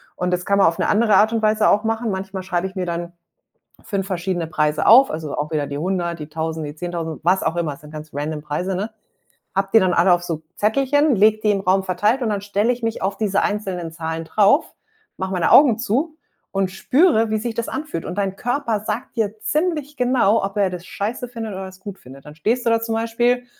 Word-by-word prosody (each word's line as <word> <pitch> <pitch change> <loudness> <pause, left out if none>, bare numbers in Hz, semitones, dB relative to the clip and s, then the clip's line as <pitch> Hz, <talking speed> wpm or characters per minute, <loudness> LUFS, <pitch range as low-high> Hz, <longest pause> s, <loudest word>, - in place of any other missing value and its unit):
Und 180 0 -2
das 180 0 -1
kann 200 0 +2
man 195 - +6
auf 165 - 0
'ne - - +1
andere 215 -1 +3
Art 215 +3 +4
und 225 - 0
Weise 215 0 +3
auch 210 - +3
machen. 225 0 -1
Manchmal 190 0 -5
schreibe 180 0 -1
ich 190 - -13
mir 185 -1 -2
dann 170 0 -4 0.7
5 195 -2 -2
verschiedene 180 -2 -2
Preise 150 -1 0
auf, 255 +5 +7
also 155 -2 -4
auch 150 +1 -3
wieder 150 -2 0
die 140 - -5
100, 175 0 -2
die 150 - -7
1.000, 160 0 -3
die 145 - -7
10.000, 165 -1 -5
was 185 +2 +3
auch 170 - -1
immer, 155 -4 -2
sind 150 +1 -14
ganz 155 0 -9
random 150 +2 -3
Preise, 165 +6 -3
ne? 205 +5 -3 0.6
Habe 195 0 0
die - - +10
dann 185 -1 +2
alle 175 +2 +4
auf 175 - -2
so 165 -3 -4 0.2
Zettelchen, 275 +6 +2
lege 215 +2 +4
die 210 - +3
im 200 -1 +1
Raum 190 0 +2
verteilt 205 +8 +1
und 225 - 0
dann 205 - -1
stelle 205 +3 +1
ich 245 0 -7
mich 225 -1 -2
auf 195 +1 -2
diese 205 -2 +1
einzelnen 190 -5 -2
Zahlen 160 0 -4
drauf, 210 - +3 0.4
mache 190 0 -3
meine 180 -2 +1
Augen 270 -7 +7
zu 260 +8 -1 0.4
und 195 -1 0
spüre, 230 - +2
wie 220 - +1
sich 230 +1 -4
das 235 - -3
anfühlt. 270 - -4
Und 180 - -5
dein 195 -1 -1
Körper 245 -3 -1
sagt 220 +4 -4
dir 220 -1 -1
ziemlich 300 +4 -1
genau, 245 -5 +2
ob 195 +1 -4
er 200 -2 +3
das 180 -1 -7
scheiße 230 +4 -4
findet 225 -3 -6
oder 190 0 -5
es 190 0 -15
gut 195 -1 -8
findet. 135 +2 -14
Dann 150 - -11
stehst 230 +10 -1
du - - +4
da 230 - +4
zum 225 0 -2
Beispiel 240 +2 +1
195 Hz, 235 wpm, -21 LUFS, 175-225 Hz, 0.7 s, die